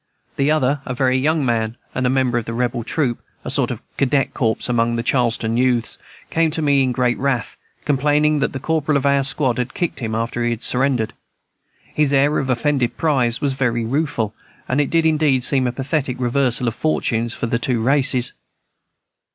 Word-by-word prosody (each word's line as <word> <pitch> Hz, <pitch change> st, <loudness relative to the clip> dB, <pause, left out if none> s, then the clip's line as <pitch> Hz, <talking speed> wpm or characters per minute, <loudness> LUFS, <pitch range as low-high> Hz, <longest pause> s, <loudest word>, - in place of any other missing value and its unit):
The 140 Hz, +1 st, +1 dB
other, 145 Hz, -2 st, +1 dB
a 125 Hz, -, -5 dB
very 130 Hz, 0 st, +1 dB
young 150 Hz, +2 st, +1 dB
man, 115 Hz, -1 st, -1 dB, 0.2 s
and 125 Hz, 0 st, 0 dB
a -, -, +2 dB
member 130 Hz, -2 st, +1 dB
of 115 Hz, -, -7 dB
the 115 Hz, -, -5 dB
"Rebel 120 Hz, 0 st, -1 dB
Troop," 125 Hz, -1 st, -1 dB, 0.2 s
a -, -, -1 dB
sort -, -, +1 dB
of -, -, -6 dB
Cadet 135 Hz, 0 st, +1 dB
corps 110 Hz, -3 st, 0 dB
among 120 Hz, -1 st, +1 dB
the 115 Hz, -, -2 dB
Charleston 115 Hz, -3 st, 0 dB
youths, 125 Hz, -3 st, +1 dB, 0.3 s
came 165 Hz, 0 st, +2 dB
to 160 Hz, +1 st, -2 dB
me 140 Hz, -2 st, +3 dB
in 130 Hz, -1 st, +1 dB
great 125 Hz, -1 st, 0 dB
wrath, 135 Hz, -3 st, -1 dB, 0.3 s
complaining 150 Hz, +1 st, +2 dB
that 135 Hz, -, 0 dB
the 135 Hz, -, -5 dB
corporal 155 Hz, 0 st, 0 dB
of 140 Hz, -, -2 dB
our 140 Hz, 0 st, +3 dB
squad 130 Hz, -3 st, +2 dB
had 125 Hz, +1 st, -3 dB
kicked 175 Hz, -5 st, -2 dB
him 110 Hz, -3 st, -3 dB
after 115 Hz, +1 st, -2 dB
he 120 Hz, -, +1 dB
had 115 Hz, 0 st, -3 dB
surrendered. 125 Hz, -3 st, +1 dB, 0.8 s
His 150 Hz, -2 st, +1 dB
air 140 Hz, +2 st, +3 dB
of 135 Hz, -, -3 dB
offended 125 Hz, 0 st, 0 dB
pride 125 Hz, -7 st, +1 dB
was 140 Hz, -2 st, 0 dB
very 120 Hz, -3 st, -1 dB
rueful, 125 Hz, -4 st, -1 dB, 0.3 s
and 130 Hz, +3 st, +1 dB
it 145 Hz, -, -1 dB
did 165 Hz, -1 st, +2 dB
indeed 150 Hz, -5 st, +2 dB
seem 130 Hz, -1 st, +2 dB
a -, -, 0 dB
pathetic 135 Hz, 0 st, -2 dB
reversal 125 Hz, -1 st, +1 dB
of 115 Hz, -, 0 dB
fortunes 120 Hz, -4 st, -1 dB
for -, -, -3 dB
the 115 Hz, 0 st, -1 dB
two 120 Hz, 0 st, 0 dB
races. 130 Hz, 0 st, +3 dB
130 Hz, 200 wpm, -20 LUFS, 120-140 Hz, 0.8 s, me